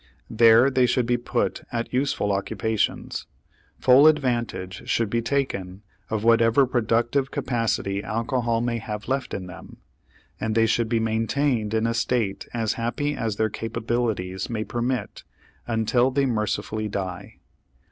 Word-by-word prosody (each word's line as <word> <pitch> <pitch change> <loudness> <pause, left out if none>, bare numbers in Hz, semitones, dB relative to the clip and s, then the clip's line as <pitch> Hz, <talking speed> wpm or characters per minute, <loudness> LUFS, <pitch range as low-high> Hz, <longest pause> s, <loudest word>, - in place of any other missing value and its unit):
There 115 +3 +6
they 130 -1 +3
should 125 0 +1
be 120 +1 +1
put 120 - -2
at 115 +1 -3
useful 125 -6 0
occupations; 110 +2 -2 0.5
full 130 +4 +6
advantage 120 -10 0
should 115 -3 +1
be 115 - +1
taken 105 -7 -2 0.3
of 110 -1 -2
whatever 115 +3 +5
productive 120 +2 +1
capacity 115 -6 -1
alcohol 115 +1 -1
may 120 -1 -1
have 105 -1 -6
left 135 0 -1
in 95 - -4
them; 90 0 -11 0.6
and 110 -1 -2
they 115 0 +4
should 115 0 +1
be 115 -1 +2
maintained 115 +1 0
in 110 0 +1
a 115 - +1
state 115 -3 -1
as 115 -3 -1
happy 145 +5 -1
as 110 -5 -2
their 110 0 0
capabilities 110 -5 -2
may 110 -2 -2
permit 120 -1 -3 0.4
until 120 +2 +2
they 135 +1 +1
mercifully 110 -2 -1
die. 95 -3 -5
115 Hz, 140 wpm, -24 LUFS, 110-125 Hz, 0.6 s, There